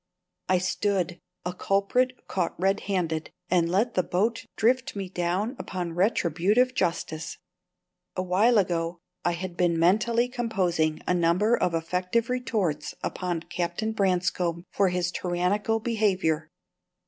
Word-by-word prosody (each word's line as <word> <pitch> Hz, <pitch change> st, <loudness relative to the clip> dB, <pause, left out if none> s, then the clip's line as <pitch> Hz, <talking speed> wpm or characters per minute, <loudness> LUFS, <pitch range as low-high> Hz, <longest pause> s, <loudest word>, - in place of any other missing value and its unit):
I 185 Hz, -, +5 dB
stood 185 Hz, -1 st, 0 dB, 0.3 s
a 180 Hz, -, -2 dB
culprit 225 Hz, +8 st, 0 dB
caught 180 Hz, -3 st, -2 dB
red 195 Hz, +2 st, +2 dB
handed 165 Hz, -5 st, -1 dB, 0.2 s
and 170 Hz, -2 st, +3 dB
let 210 Hz, +7 st, +1 dB
the 185 Hz, -, +3 dB
boat 215 Hz, +6 st, -1 dB
drift 255 Hz, +4 st, +2 dB
me 195 Hz, -2 st, -4 dB
down 185 Hz, +7 st, -1 dB
upon 175 Hz, -3 st, -4 dB
retributive 195 Hz, +6 st, +2 dB
justice. 165 Hz, -, -2 dB, 0.8 s
A 185 Hz, -, -1 dB
while 205 Hz, +6 st, +4 dB
ago 170 Hz, -3 st, 0 dB, 0.3 s
I 175 Hz, -, +2 dB
had 175 Hz, 0 st, -5 dB
been 175 Hz, -2 st, +2 dB
mentally 220 Hz, +8 st, +3 dB
composing 185 Hz, -11 st, 0 dB
a -, -, +2 dB
number 180 Hz, +6 st, +3 dB
of 175 Hz, -6 st, 0 dB
effective 180 Hz, +8 st, 0 dB
retorts 205 Hz, -12 st, -1 dB
upon 175 Hz, -3 st, -2 dB
Captain 175 Hz, +7 st, -2 dB
Branscome 180 Hz, -4 st, 0 dB
for 195 Hz, -2 st, +3 dB
his 180 Hz, 0 st, -1 dB
tyrannical 185 Hz, +6 st, 0 dB
behaviour. 190 Hz, -9 st, +1 dB
185 Hz, 130 wpm, -27 LUFS, 175-215 Hz, 0.8 s, I